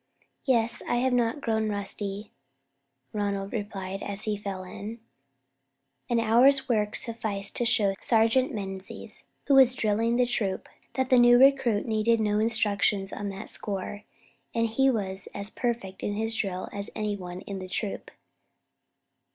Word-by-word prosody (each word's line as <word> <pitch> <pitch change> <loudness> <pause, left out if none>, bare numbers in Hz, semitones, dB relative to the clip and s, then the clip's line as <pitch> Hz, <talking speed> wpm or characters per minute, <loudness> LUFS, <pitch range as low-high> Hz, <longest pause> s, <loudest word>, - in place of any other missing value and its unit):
"Yes; 235 -2 +2
I - - +2
have 250 +1 +1
not 245 +3 +1
grown 220 -3 0
rusty," 205 0 -2 0.8
Ronald 200 -1 -2
replied, 195 -3 -4
as 200 +1 -2
he 215 -1 0
fell 200 -2 -5
in. 210 +5 -8 1.1
An 240 -1 +2
hour's 255 +5 +4
work 210 -4 0
sufficed 215 -4 0
to 240 - 0
show 220 -5 +2
Sergeant 230 +3 +3
Menzies, 195 -4 -5 0.2
who 280 - +2
was 260 -2 +7
drilling 225 +2 +1
the 250 0 +3
troop, 205 -6 -2 0.3
that 260 0 -1
the 255 - +7
new 240 0 +7
recruit 265 -5 +4
needed 225 +1 +2
no 210 -1 +1
instructions 205 -3 +1
on 205 -1 -4
that 195 +2 -7
score, 205 0 -4 0.5
and 230 0 +2
that - - -11
he 270 +3 +4
was 195 -5 -1
as 200 +1 -4
perfect 230 -6 -3
in 205 - -2
his 225 +1 -1
drill 190 -4 -2
as 200 +1 -4
any 210 -1 -1
one 180 -1 -7
in 195 -1 -6
the 185 0 -8
troop. 200 +2 -4
215 Hz, 155 wpm, -27 LUFS, 200-235 Hz, 1.1 s, was